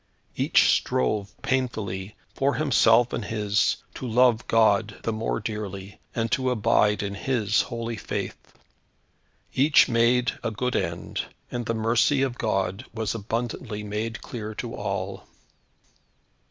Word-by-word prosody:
Each - - +4
strove 100 +10 0
painfully, 110 -7 -2 0.2
for 140 +1 +1
himself 120 -5 +4
and 115 - -2
his, 105 -1 +1 0.2
to 130 - -6
love 120 0 +3
God 110 -2 +3
the 115 - -1
more 110 +1 -1
dearly, 100 -3 -6 0.2
and 115 -1 -1
to 130 +2 +1
abide 105 -3 +2
in 100 0 -3
His 110 0 +1
holy 115 -1 -4
faith. - - -5 1.0
Each 145 +3 +5
made 120 +1 +2
a - - 0
good 125 +4 -2
end, 85 +1 -2 0.3
and 120 -2 -3
the 115 - 0
mercy 115 +5 +2
of 130 -2 -2
God 95 -1 -1
was 110 -1 -2
abundantly 115 0 -4
made 110 +2 -4
clear 110 -2 -6
to - - -5
all. - - -4
115 Hz, 130 wpm, -25 LUFS, 105-120 Hz, 1.0 s, Each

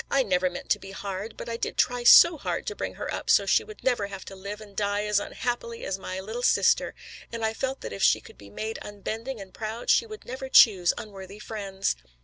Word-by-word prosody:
I 275 -1 +3
never 185 -4 +1
meant 180 - -8
to - - +3
be 195 - -10
hard, 195 +2 -6
but - - -7
I 230 0 -3
did - - -3
try 245 -1 +1
so 340 +7 +9
hard 300 - -3
to 420 - -4
bring - - -4
her - - -4
up - - -5
so - - +5
she - - +3
would 430 -1 -13
never 245 -6 +1
have 195 -2 -8
to 195 - -9
live 200 +2 -7
and 205 -2 -13
die 205 +1 0
as 210 -1 +2
unhappily 235 +2 -4
as 195 0 -3
my 185 0 -5
little 220 +5 -5
sister, - - +3 0.4
and 230 -1 -2
I 220 - 0
felt 265 +3 -3
that - - -6
if 100 - -6
she - - +5
could - - -15
be 100 - -13
made 220 - -5
unbending 220 +4 -5
and 190 -2 -10
proud 220 +2 -2
she 460 - +3
would 430 -1 -10
never 260 +2 -6
choose 190 -9 +7
unworthy 195 -1 -9
friends." 200 - -3
210 Hz, 240 wpm, -26 LUFS, 195-240 Hz, 0.4 s, so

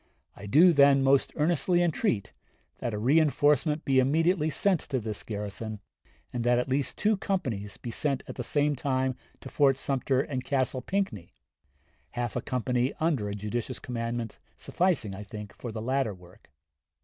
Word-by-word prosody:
I 100 - -9
do, 165 - +6
then, 140 -2 +5
most 135 0 +3
earnestly 175 +3 +2
entreat 130 - 0 0.5
that 120 - -2
a - - -3
reënforcement 150 +4 +2
be 135 -1 +3
immediately 160 +4 +2
sent 185 +3 +2
to 135 -3 0
this 110 -2 -4
garrison, 105 +1 -5 0.5
and 120 -1 -2
that 120 0 +3
at 125 - 0
least 135 +1 -1
two 210 0 +2
companies 115 - -3
be 120 - -6
sent 135 +2 -1
at - - -6
the 125 - -5
same 145 +3 +1
time 130 -1 -1 0.3
to - - -9
Fort 135 -2 +3
Sumter 135 -1 0
and 130 -3 -4
Castle 130 -1 -1
Pinckney 150 - -3 0.8
half 120 -2 -2
a - - -1
company, 125 +1 -1
under 145 -11 0
a 100 - -4
judicious 115 +4 -4
commander, 115 -2 -4 0.2
sufficing, 170 - 0
I 100 - -8
think, 105 -2 -8
for 120 - -6
the 110 0 -5
latter 130 -4 0
work.... 90 0 -19
130 Hz, 165 wpm, -28 LUFS, 115-150 Hz, 0.8 s, do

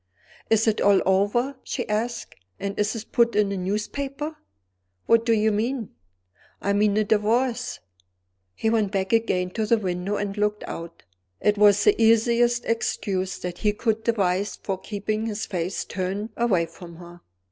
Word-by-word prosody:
"Is 225 0 +3
it 220 - +2
all 200 -1 +5
over?" 205 +8 +1
she - - -4
asked. 235 +3 -2 0.3
"And 200 0 -4
is 210 +3 +1
it 220 -1 -8
put 235 -1 +3
in 210 -1 +3
the 200 - -2
newspaper?" 275 - -3 0.7
"What 230 +1 +3
do - - +4
you 220 -1 +3
mean?" 225 +2 -2 0.7
"I 200 - 0
mean 205 0 +2
the 215 - +3
Divorce." 235 +4 0 0.8
He 220 - 0
went 215 -4 +1
back 195 +1 -1
again 185 -5 +1
to 220 +1 -2
the 230 - +4
window 185 0 -2
and 200 -1 -3
looked 210 0 0
out. 170 0 -8 0.4
It 210 - +2
was 205 -1 +6
the - - +4
easiest 235 +2 +3
excuse 195 -4 -1
that 175 -1 -6
he 210 -1 +1
could 225 0 -1
devise 200 -3 0
for 190 -2 -4
keeping 215 +2 -3
his 215 -1 -3
face 180 0 -3
turned 195 +3 -3
away 200 -8 +2
from 170 +1 -12
her. 175 0 -13
210 Hz, 165 wpm, -24 LUFS, 195-230 Hz, 0.8 s, was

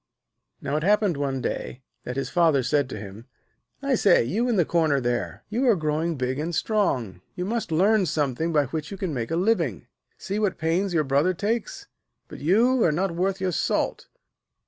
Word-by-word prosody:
Now 140 +2 -1
it 155 - -2
happened 205 -2 +3
one 135 -2 -2
day 125 +1 -4 0.2
that 125 - -4
his 135 - -3
Father 160 -7 +3
said 135 +2 +1
to - - -6
him: 100 +3 -10 0.6
'I - - +1
say, - - +4
you 220 - -1
in 235 - +2
the 175 -5 +3
corner 160 -4 +2
there, 120 -7 -2
you 245 +5 0
are 225 - +5
growing 160 0 -1
big 130 0 -2
and 165 +2 -2
strong. 130 - 0
You 180 - -3
must 225 -3 -3
learn 195 +4 +3
something 155 +1 -1
by 150 -3 +3
which 155 +3 -5
you 195 - -7
can 185 -5 -3
make 120 -4 -3
a 165 - -1
living. 170 - 0 0.3
See 200 +2 -3
what 205 -4 0
pains 175 +5 0
your 155 - +3
brother 145 +7 +1
takes, 220 +4 -2 0.4
but - - -10
you 225 - +3
are 165 - +4
not 180 +5 0
worth 190 +3 -1
your 185 -1 0
salt.' - - -1
160 Hz, 195 wpm, -25 LUFS, 135-195 Hz, 0.6 s, are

